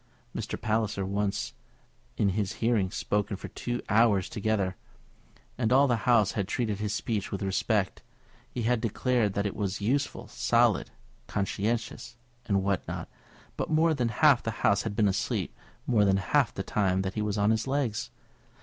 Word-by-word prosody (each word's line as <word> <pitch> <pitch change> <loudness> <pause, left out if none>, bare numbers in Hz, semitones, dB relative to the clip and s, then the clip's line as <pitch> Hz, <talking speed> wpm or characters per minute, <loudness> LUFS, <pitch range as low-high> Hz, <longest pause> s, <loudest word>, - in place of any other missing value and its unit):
Mr. - - -4
Palliser 110 -2 0
had 95 - -4
once, 100 -11 -1 0.6
in 100 - +3
his 95 0 -1
hearing, 110 -5 +1
spoken 100 +1 -1
for - - -8
two 120 0 -4
hours 105 -3 +3
together, 100 -3 -1 0.8
and 110 -2 +1
all 135 +2 +6
the 120 0 0
House 110 -5 +5
had 100 -3 -2
treated 110 -3 -1
his 105 -1 -2
speech 110 -2 -2
with 100 - -3
respect, 95 0 0 0.5
had 120 -1 +1
declared 115 -1 +1
that 100 +1 -1
it 100 - -2
was 100 -2 -2
useful, 135 +8 -1
solid, - - +2 0.4
conscientious, 115 +4 -2 0.3
and 100 -2 +2
what 100 -2 -1
not; - - -5 0.5
but - - -3
more 160 +1 +3
than 125 -5 0
half 140 +3 +4
the - - -3 0.2
House 100 - +4
had 110 -2 -4
been 105 -1 +3
asleep 95 - -1 0.3
more 110 -4 +3
than 95 -1 +3
half 120 +6 +2
the 95 - -4
time 95 -2 +1
that 95 0 -3
he 105 - -2
was 105 0 -1
on 105 +1 +3
his 110 +3 0
legs. 130 -6 -1
105 Hz, 170 wpm, -28 LUFS, 100-120 Hz, 0.8 s, all